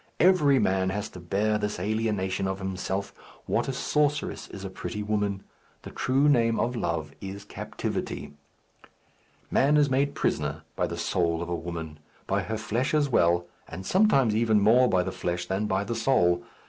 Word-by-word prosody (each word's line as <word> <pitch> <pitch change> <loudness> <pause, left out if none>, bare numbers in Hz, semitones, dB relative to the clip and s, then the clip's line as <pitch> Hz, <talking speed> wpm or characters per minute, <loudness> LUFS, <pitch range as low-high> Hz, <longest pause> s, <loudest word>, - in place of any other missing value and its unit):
Every 160 -6 +5
man 95 -5 +2
has 100 +2 -3
to 90 - -11
bear 105 +5 0
this 105 -3 -2
alienation 100 -2 -1
of 95 0 -2
himself. 95 +1 -3 0.3
What - - 0
a - - 0
sorceress 150 +3 0
is 95 0 -8
a - - -4
pretty 105 +2 -5
woman! 105 -2 -1 0.4
The - - -8
true 135 +3 +2
name 115 -5 +3
of 120 +1 0
love 85 -8 -2
is 100 +1 -7
captivity. 105 - -5 1.2
Man 145 +3 +4
is 145 -2 +3
made 140 +2 +1
prisoner - - -1
by - - 0
the - - -5
soul 85 -2 0
of 85 - -7
a 85 - 0
woman; 80 -2 -6 0.3
by - - 0
her 110 +1 -3
flesh 115 +7 -1
as 145 -2 +2
well, 85 -6 +3 0.2
and 95 +3 -8
sometimes 140 - +3
even 110 -1 +3
more 120 +5 +5
by 90 -1 +2
the - - -3
flesh 90 0 -3
than 95 +4 -1
by 95 0 0
the 105 - -3
soul. 110 -7 +2
105 Hz, 175 wpm, -27 LUFS, 95-125 Hz, 1.2 s, Every